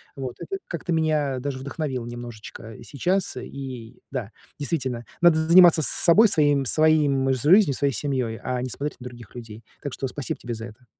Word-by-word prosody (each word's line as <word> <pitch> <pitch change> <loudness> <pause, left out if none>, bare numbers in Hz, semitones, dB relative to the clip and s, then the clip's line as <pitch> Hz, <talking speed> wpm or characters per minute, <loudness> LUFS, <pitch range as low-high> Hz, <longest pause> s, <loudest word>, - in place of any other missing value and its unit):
вот. 130 -3 -6
Это 390 - -5
как-то 170 0 -5
меня 155 -4 0
даже 135 0 -4
вдохновило 135 -2 -4
немножечко 120 -2 -9
сейчас. 180 +2 -1
И 125 -3 -8
да, 120 -6 -4 0.3
действительно, 130 -5 -3 0.2
надо 175 -2 +6
заниматься 170 -1 +7
с - - +5
собой, 195 +6 +5
своим 145 -6 +2
своим 145 -2 +3
жизнью, 150 - +4
своей 140 0 0
семьей, 125 -2 -2
а 125 -1 -2
не 130 - -4
смотреть 145 +4 -5
на 125 - -11
других 120 -3 -11
людей. 115 -2 -10 0.2
Так 145 - -5
что 135 - -3
спасибо 135 0 -5
тебе 120 -1 -5
за 110 0 -7
это. 120 +3 -16
135 Hz, 175 wpm, -24 LUFS, 120-155 Hz, 0.3 s, заниматься